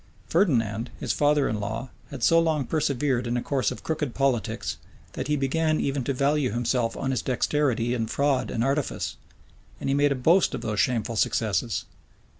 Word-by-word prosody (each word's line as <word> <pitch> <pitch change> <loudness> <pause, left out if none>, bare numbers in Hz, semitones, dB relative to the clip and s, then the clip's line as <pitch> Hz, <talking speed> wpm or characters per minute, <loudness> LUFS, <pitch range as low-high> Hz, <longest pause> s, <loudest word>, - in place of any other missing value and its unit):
Ferdinand, 120 - +1
his 110 - -1
father 145 +4 +3
in 110 - -2
law, 110 +5 -4 0.2
had 135 -4 -7
so 165 +6 +5
long 160 -4 +1
persevered 140 -5 0
in 120 +1 0
a - - -1
course 135 -3 0
of - - -7
crooked 150 -5 -2
politics, 130 -7 0 0.4
that - - -4
he 150 - +2
began 155 +3 +1
even 140 -1 -1
to - - 0
value 140 +1 +1
himself 120 -1 0
on 135 - -1
his 125 -4 0
dexterity 125 -2 0
in 115 -2 -1
fraud 140 +2 +1
and 115 - -1
artifice; 140 +2 -1 0.6
and - - -1
he - - +2
made 145 0 +3
a - - +2
boast 165 +9 +3
of - - -5
those 105 -2 -2
shameful 115 -1 +1
successes. - - 0
135 Hz, 185 wpm, -26 LUFS, 120-145 Hz, 0.6 s, so